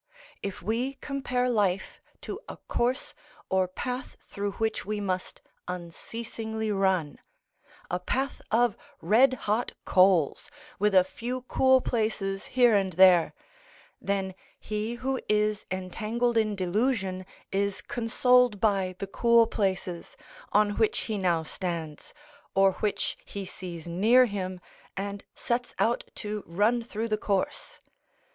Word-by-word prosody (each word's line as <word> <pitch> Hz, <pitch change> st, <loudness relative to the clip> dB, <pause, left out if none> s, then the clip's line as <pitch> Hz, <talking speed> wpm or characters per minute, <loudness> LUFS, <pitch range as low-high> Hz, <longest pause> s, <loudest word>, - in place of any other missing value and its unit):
If 200 Hz, -3 st, -5 dB
we 240 Hz, +7 st, -1 dB
compare 265 Hz, -2 st, -1 dB
life 205 Hz, -6 st, 0 dB, 0.2 s
to 400 Hz, -, -5 dB
a -, -, -7 dB
course 250 Hz, +3 st, -1 dB, 0.4 s
or 190 Hz, -1 st, +3 dB
path 250 Hz, +8 st, -5 dB
through 200 Hz, 0 st, -3 dB
which 220 Hz, +1 st, -1 dB
we 210 Hz, +1 st, -3 dB
must 185 Hz, -2 st, -3 dB, 0.2 s
unceasingly 220 Hz, +5 st, -5 dB
run—a 185 Hz, -2 st, -3 dB
path 265 Hz, +9 st, -2 dB
of 235 Hz, -1 st, +3 dB, 0.2 s
red 260 Hz, +5 st, +4 dB
hot 215 Hz, +4 st, 0 dB
coals, 185 Hz, -, +3 dB, 0.3 s
with 210 Hz, 0 st, +2 dB
a 185 Hz, -, +8 dB
few 240 Hz, +7 st, -5 dB
cool 260 Hz, 0 st, +4 dB
places 210 Hz, -5 st, -1 dB
here 245 Hz, -3 st, +4 dB
and 190 Hz, -2 st, +1 dB
there; 180 Hz, -1 st, +6 dB, 0.7 s
then 195 Hz, -1 st, -1 dB, 0.3 s
he 215 Hz, +2 st, -3 dB
who 260 Hz, +2 st, -2 dB
is 210 Hz, 0 st, +1 dB
entangled 215 Hz, +6 st, -1 dB
in 215 Hz, -2 st, +2 dB
delusion 190 Hz, 0 st, 0 dB, 0.3 s
is 200 Hz, 0 st, -1 dB
consoled 245 Hz, -1 st, +3 dB
by 195 Hz, -4 st, +1 dB
the 200 Hz, -, -4 dB
cool 235 Hz, +3 st, +4 dB
places, 190 Hz, -5 st, -2 dB, 0.3 s
on 205 Hz, 0 st, +3 dB
which 220 Hz, -1 st, +2 dB
he 220 Hz, -2 st, -3 dB
now 170 Hz, -3 st, +1 dB
stands, 165 Hz, -2 st, -5 dB, 0.4 s
or 195 Hz, 0 st, +5 dB
which 210 Hz, -1 st, -1 dB
he 200 Hz, -1 st, -6 dB
sees 175 Hz, -3 st, -8 dB
near 215 Hz, +9 st, +5 dB
him, 185 Hz, -4 st, -4 dB, 0.4 s
and 200 Hz, +1 st, -4 dB
sets 245 Hz, +1 st, -2 dB
out 235 Hz, +2 st, +1 dB
to 210 Hz, -1 st, -4 dB
run 210 Hz, +8 st, +2 dB
through 230 Hz, -1 st, -4 dB
the 215 Hz, -1 st, 0 dB
course. 200 Hz, -3 st, -2 dB
210 Hz, 125 wpm, -28 LUFS, 190-235 Hz, 0.7 s, a